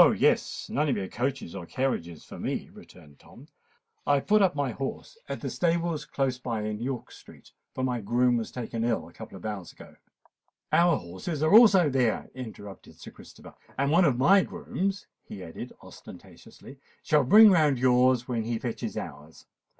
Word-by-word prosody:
yes—none 150 +1 0
of - - 0
your 95 -2 -3
coaches 125 -6 -3
or 95 -2 -6
carriages 85 - -3
for - - -11
me," - - -4
returned 75 -2 -16
Tom. - - -16 0.6
"I 145 - +4
have 140 - -1
put 215 0 +4
up 190 -5 +3
my 140 -3 -1
horse 135 - -6
at - - -5
the - - -3
stables 170 -2 -1
close 130 -2 -2
by 115 -4 -3
in 105 0 -4
York 125 0 -5
Street; - - -16 0.2
for 130 - -3
my 125 -2 -1
groom 120 +4 +2
was 115 - -4
taken 115 -2 -4
ill 115 -9 -1
a 85 - -17
couple 110 -3 -10
of 90 - -12
hours 100 -5 -5
ago——" - - -15 0.8
"Our 170 0 +4
horses 95 - -5
are 155 - +2
also 210 -7 +7
there," 130 -5 0
interrupted 110 -6 -10
Sir - - -11
Christopher; - - -15 0.2
"and 140 +1 +1
one 175 +3 +5
of 135 -6 +2
my 190 +10 +5
grooms," 195 +2 -4 0.2
he 95 - -9
added 80 - -8
ostentatiously, 135 +1 -14 0.2
"shall 150 -2 +3
bring 210 - +8
round 155 -7 +3
yours 125 -1 +3
when 120 -3 -1
he 115 +1 -2
fetches 115 0 -5
ours. 75 +2 -9
130 Hz, 180 wpm, -27 LUFS, 110-150 Hz, 0.8 s, bring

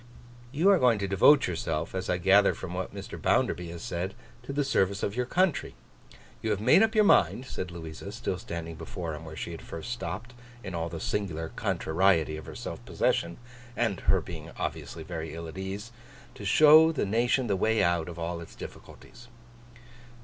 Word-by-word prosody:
'You 155 +7 +1
are 190 - +5
going 120 -3 +4
to 100 -1 -2
devote 135 +9 +6
yourself, 80 -3 -3
as 95 0 -3
I 90 - +2
gather 95 +3 +5
from 90 -2 -7
what 95 +1 -4
Mr. 100 -1 -8
Bounderby 90 -1 +1
has 85 0 -8
said, 90 +3 -3 0.3
to - - -7
the 145 +1 0
service 100 -7 +1
of 100 - -1
your 125 0 -1
country. 180 +1 +1 0.7
You 110 - -2
have 105 -2 0
made 125 - +5
up 225 0 +3
your 215 - +6
mind,' 135 -9 +4
said 95 -7 -5
Louisa, 85 +2 -8
still 105 -4 -3
standing 85 -1 -6
before 80 +1 -6
him 75 +1 -8
where 80 -1 -8
she 85 - -5
had 85 - -8
first 85 +9 -7
stopped—in 120 -1 -7
all 85 0 -2
the 85 0 -6
singular 80 -4 -2
contrariety 80 -2 +1
of 80 - -9
her - - -8
self - - -6
possession, 85 0 0 0.4
and 110 -6 0
her - - +2
being - - -8
obviously 80 - -4
very 80 -1 -6
ill 85 0 -6
at 80 - -9
ease—'to 110 +5 -9
show 155 +9 +7
the 155 - -1
nation 120 +5 +1
the 100 -4 +1
way 110 +3 +2
out 85 -2 +1
of 85 - -8
all 85 0 -3
its 85 - -11
difficulties. 120 - -12
95 Hz, 190 wpm, -28 LUFS, 85-120 Hz, 0.7 s, show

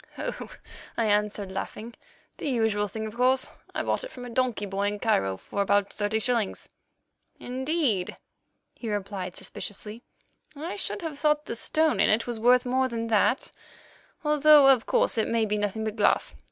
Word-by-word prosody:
"Oh!" - - -5 0.5
I 230 - +2
answered, 210 -2 0
laughing, 215 +4 -6 0.4
"the - - -2
usual 220 -4 +1
thing, 220 +2 -5
of 215 - -6
course. 255 +2 +2 0.2
I - - -1
bought - - -1
it - - -6
from 250 -1 -9
a 245 - -8
donkey 245 -4 0
boy 200 +1 -1
in 205 0 -2
Cairo 95 - +1
for 200 - -4
about 200 0 +2
thirty 205 +1 -1
shillings." 230 -2 -1 0.7
"Indeed," 260 - -1 0.6
he 230 - -6
replied 195 -3 -4
suspiciously. 210 +3 -8 0.5
"I 315 +5 -5
should 400 -2 -3
have 305 -3 -5
thought 300 0 +2
the - - -4
stone 315 +6 +1
in - - +4
it 220 +2 +3
was 240 -2 -4
worth 245 +2 +4
more 260 +1 +1
than 230 -2 -4
that, 230 +6 +2 0.7
although, 300 -1 +6
of 255 -4 +4
course, - - +2
it 220 - +1
may 230 -1 +1
be 210 0 -1
nothing 205 +1 -2
but 215 0 -3
glass. 210 - +2
225 Hz, 175 wpm, -27 LUFS, 205-260 Hz, 0.7 s, although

